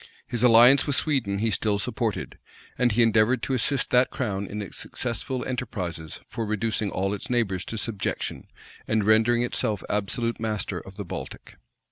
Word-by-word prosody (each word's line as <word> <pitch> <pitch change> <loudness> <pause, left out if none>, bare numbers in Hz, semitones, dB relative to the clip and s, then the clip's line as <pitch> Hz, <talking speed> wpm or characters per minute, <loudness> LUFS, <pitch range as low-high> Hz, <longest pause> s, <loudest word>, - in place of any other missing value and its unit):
His 120 -3 -3
alliance 125 +4 +7
with 145 - +2
Sweden 125 -11 +1
he 110 +2 0
still 105 +1 +1
supported; 100 - -3 0.4
and 125 -1 +2
he 120 +3 +4
endeavored 115 +2 +3
to 135 - -1
assist 130 +1 +1
that 125 +1 +4
crown 100 -5 -3
in 105 - -5
its 100 -4 -6
successful 125 +1 -4
enterprises 95 - -5
for 115 - -4
reducing 110 0 -1
all 95 +1 -1
its 100 - -5
neighbors 105 -7 0
to 115 - -5
subjection, 110 -2 -3 0.4
and 110 -1 +1
rendering 110 +3 +4
itself 110 -3 -1
absolute 115 +3 -1
master 110 -4 -2
of - - -12
the - - -6
Baltic. - - -7
115 Hz, 165 wpm, -25 LUFS, 105-120 Hz, 0.4 s, alliance